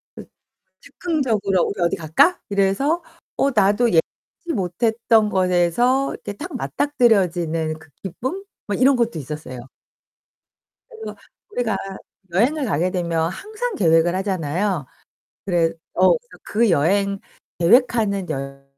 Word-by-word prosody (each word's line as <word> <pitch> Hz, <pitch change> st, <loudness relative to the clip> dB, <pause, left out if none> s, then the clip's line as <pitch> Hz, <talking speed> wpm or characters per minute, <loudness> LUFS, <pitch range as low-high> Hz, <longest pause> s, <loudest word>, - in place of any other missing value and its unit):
그 -, -, -10 dB, 0.5 s
즉흥적으로 235 Hz, -, -1 dB
"우리 195 Hz, -3 st, -3 dB
어디 170 Hz, -, +1 dB
갈까?" 165 Hz, -, +3 dB
이래서 200 Hz, -, +1 dB, 0.3 s
어 275 Hz, -, +2 dB
나도 210 Hz, +2 st, +3 dB
예상치 270 Hz, -, -2 dB
못했던 220 Hz, +3 st, +1 dB
것에서 190 Hz, +9 st, +2 dB
이렇게 -, -, -7 dB
딱 305 Hz, -, -8 dB
맞닥뜨려지는 180 Hz, -, +1 dB
그 160 Hz, 0 st, -18 dB
기쁨? 260 Hz, -, -5 dB, 0.2 s
뭐 205 Hz, -, -1 dB
이런 265 Hz, +1 st, +5 dB
것도 235 Hz, -7 st, 0 dB
있었어요. 145 Hz, -3 st, -7 dB, 1.3 s
그래서 450 Hz, -2 st, -9 dB, 0.3 s
우리가 235 Hz, -, -1 dB, 0.6 s
여행을 270 Hz, -, +2 dB
가게 180 Hz, -, 0 dB
되면 170 Hz, -2 st, -1 dB
항상 435 Hz, -, -5 dB
계획을 165 Hz, -1 st, +3 dB
하잖아요? 185 Hz, -3 st, -1 dB, 0.6 s
그래 170 Hz, -3 st, +2 dB, 0.2 s
어 185 Hz, +1 st, +4 dB
그래서 485 Hz, 0 st, -19 dB
그 230 Hz, +1 st, +1 dB
여행 195 Hz, +5 st, +2 dB, 0.4 s
계획하는 200 Hz, -1 st, +3 dB
여 135 Hz, -2 st, -5 dB
200 Hz, 270 characters per minute, -21 LUFS, 170-245 Hz, 1.3 s, 이런